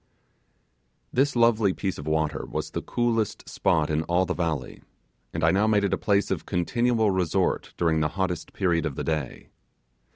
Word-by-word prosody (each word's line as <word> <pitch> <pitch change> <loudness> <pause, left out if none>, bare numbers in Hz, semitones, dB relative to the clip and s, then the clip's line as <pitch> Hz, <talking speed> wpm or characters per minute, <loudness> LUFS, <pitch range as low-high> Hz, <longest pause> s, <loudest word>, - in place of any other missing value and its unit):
This 140 +1 +2
lovely 115 -4 +4
piece 95 -3 -3
of 75 - -8
water 80 -2 -1
was - - -4
the - - -3
coolest 115 -3 -1
spot 80 0 +1
in 75 +1 +1
all 90 +2 +2
the 90 - -1
valley, 80 -8 -3 0.5
and 80 - -4
I 80 - +5
now 100 +4 +2
made 105 -2 +3
it 100 -2 +1
a - - +2
place 100 -1 +1
of - - -3
continual 110 +4 +1
resort 90 -4 0
during 80 -2 +2
the 75 - +2
hottest 90 -3 -2
period 85 -4 +1
of 70 - -5
the - - -3
day. 75 -5 -3
90 Hz, 175 wpm, -26 LUFS, 80-105 Hz, 0.5 s, I